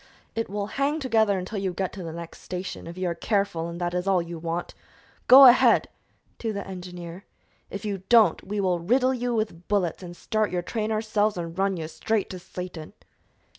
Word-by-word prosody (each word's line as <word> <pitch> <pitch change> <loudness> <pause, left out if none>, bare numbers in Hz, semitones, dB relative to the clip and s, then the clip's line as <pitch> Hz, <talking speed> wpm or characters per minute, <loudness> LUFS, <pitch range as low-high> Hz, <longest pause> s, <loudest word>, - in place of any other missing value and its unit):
"It 225 0 -3
will 205 0 -2
hang 280 +8 -1
together 220 -7 +2
until 190 +3 -4
you 190 -2 -2
get 190 +1 -3
to 195 - -7
the 165 -2 -5
next 170 0 -9
station, 180 -2 -6
if 170 +1 -8
you 185 -1 -1
are 170 - 0
careful, 195 -4 -1
and 170 0 -7
that 175 0 -2
is 180 +1 -2
all 190 -2 +4
you 170 -1 -5
want. 170 +1 -4 0.5
Go 270 +2 +10
ahead!" 250 0 +6 0.5
to 225 - -2
the 200 -1 -5
engineer. 180 -1 -8 0.4
"If 200 +2 -6
you 200 -3 -3
don't, 225 -8 +5
we 205 +2 -4
will 185 -3 +1
riddle 255 +9 +2
you 245 -1 -1
with 210 -6 -3
bullets 195 -5 0
and 175 -1 -9
start 215 -1 0
your 180 -1 -2
train 220 +3 -2
ourselves 215 -2 0
and 165 -1 -5
run 195 0 0
you 160 -2 -4
straight 195 +7 -2
to 185 - -6
Satan!" 180 -3 -8
190 Hz, 205 wpm, -26 LUFS, 175-215 Hz, 0.5 s, Go